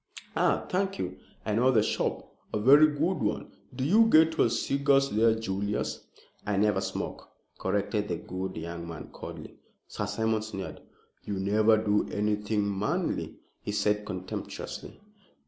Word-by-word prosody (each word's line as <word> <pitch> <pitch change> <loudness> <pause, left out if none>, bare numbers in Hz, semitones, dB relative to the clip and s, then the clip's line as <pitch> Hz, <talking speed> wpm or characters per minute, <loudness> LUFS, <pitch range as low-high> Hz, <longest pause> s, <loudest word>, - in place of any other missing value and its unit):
"Ah, - - +2
thank 195 +1 -1
you. 90 0 -4 0.3
I 110 - 0
know 120 +4 +4
the 115 -5 +4
shop. - - -1 0.3
A - - +1
very 140 +7 +7
good 155 +5 0
one! 105 -1 -2 0.2
Do 130 - -2
you 215 +10 +5
get 160 -5 +5
your 120 - +3
cigars 140 +3 +2
there, 110 +1 +4
Julius?" 100 -1 -2 0.4
"I 105 -1 -1
never 105 +1 +2
smoke," - - -5 0.3
corrected 105 +1 0
the 85 - -1
good 95 +1 -5
young 85 +1 -5
man, 80 -3 -8
coldly. - - -9 0.3
Sir 105 - -4
Simon 110 +1 0
sneered. 100 -3 -6 0.4
"You 100 - -3
never 105 +3 +3
do 105 -1 +1
anything 105 -1 0
manly," 105 - -1 0.3
he - - -4
said 105 0 +1
contemptuously. 95 -3 -6
105 Hz, 145 wpm, -28 LUFS, 100-130 Hz, 0.4 s, very